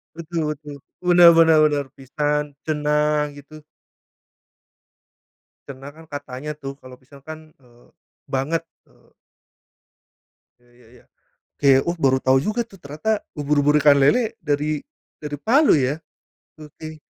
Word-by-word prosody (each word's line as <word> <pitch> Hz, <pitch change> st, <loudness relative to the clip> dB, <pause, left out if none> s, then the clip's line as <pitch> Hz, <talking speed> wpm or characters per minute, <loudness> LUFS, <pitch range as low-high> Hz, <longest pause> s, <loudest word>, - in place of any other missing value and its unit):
Betul 165 Hz, -2 st, -3 dB
betul. 145 Hz, -1 st, -11 dB, 0.3 s
Benar 175 Hz, -1 st, +7 dB
benar 165 Hz, -1 st, +5 dB
bener. 145 Hz, -2 st, 0 dB
"Pisan", 145 Hz, +2 st, -2 dB
"ceunah", 150 Hz, -1 st, 0 dB
gitu. 150 Hz, +1 st, -14 dB, 2.0 s
"Ceunah" 140 Hz, +1 st, -10 dB
kan, 160 Hz, 0 st, -15 dB
"katanya" 145 Hz, +1 st, -6 dB
tuh, 135 Hz, 0 st, -6 dB
kalau 130 Hz, 0 st, -12 dB
"pisan" 140 Hz, +1 st, -17 dB
kan, 155 Hz, +1 st, -8 dB, 0.2 s
eee, 120 Hz, 0 st, -23 dB, 0.4 s
"banget", 150 Hz, +5 st, -2 dB, 0.2 s
eee -, -, -28 dB, 1.5 s
Ya 120 Hz, -, -28 dB
ya 120 Hz, -2 st, -22 dB
ya. -, -, -30 dB, 0.5 s
Ke, 140 Hz, -, +3 dB, 0.2 s
oh 170 Hz, +1 st, -1 dB
baru 130 Hz, -4 st, +2 dB
tahu 130 Hz, 0 st, +3 dB
juga 215 Hz, +5 st, -2 dB
tuh 195 Hz, -, -17 dB
ternyata 155 Hz, +10 st, -2 dB, 0.2 s
"ubur-ubur, 145 Hz, 0 st, +2 dB
ikan 145 Hz, -1 st, +5 dB
lele" 225 Hz, -, +2 dB
dari 150 Hz, +1 st, -1 dB, 0.3 s
dari 150 Hz, -1 st, -6 dB
Palu 280 Hz, +7 st, +4 dB
ya. 135 Hz, +2 st, 0 dB, 0.6 s
Oke. 155 Hz, +1 st, -11 dB
150 Hz, 125 wpm, -21 LUFS, 140-155 Hz, 2.0 s, Benar